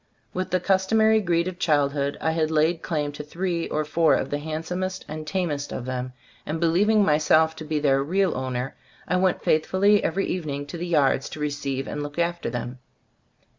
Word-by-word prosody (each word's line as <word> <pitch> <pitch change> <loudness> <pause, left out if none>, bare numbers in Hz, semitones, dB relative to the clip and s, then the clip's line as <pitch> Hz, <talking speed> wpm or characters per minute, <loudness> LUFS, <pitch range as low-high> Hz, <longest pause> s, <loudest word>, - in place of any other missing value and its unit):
With 185 0 -2
the 185 - +1
customary 215 +4 +3
greed 170 -2 +1
of 185 -1 -6
childhood 140 -2 +1
I 160 - 0
had 160 -1 0
laid 160 +2 +2
claim 150 -4 -2
to 145 +1 -7
three 170 +2 -2
or 155 0 -1
four 160 +1 +3
of 130 - -2
the 145 - -1
handsomest 170 +5 -4
and 155 0 -6
tamest 150 -4 -2
of 120 - -5
them, 130 0 -4 0.3
and 155 +2 -3
believing 200 +6 +3
my 150 -2 +3
self 160 +1 +3
to - - -6
be 155 0 -2
their 135 -2 +2
real 185 +4 +1
owner, 130 0 -3 0.3
I 180 - +1
went 185 0 +1
faithfully 190 +6 +3
every 195 +4 0
evening 145 -5 -3
to 145 +4 -7
the 175 - -3
yards 140 -5 +2
to - - -8
receive 140 -2 -2
and 150 - -4
look 145 +1 -6
after 170 -3 -1
them. 120 +1 -5
155 Hz, 195 wpm, -25 LUFS, 145-180 Hz, 0.3 s, customary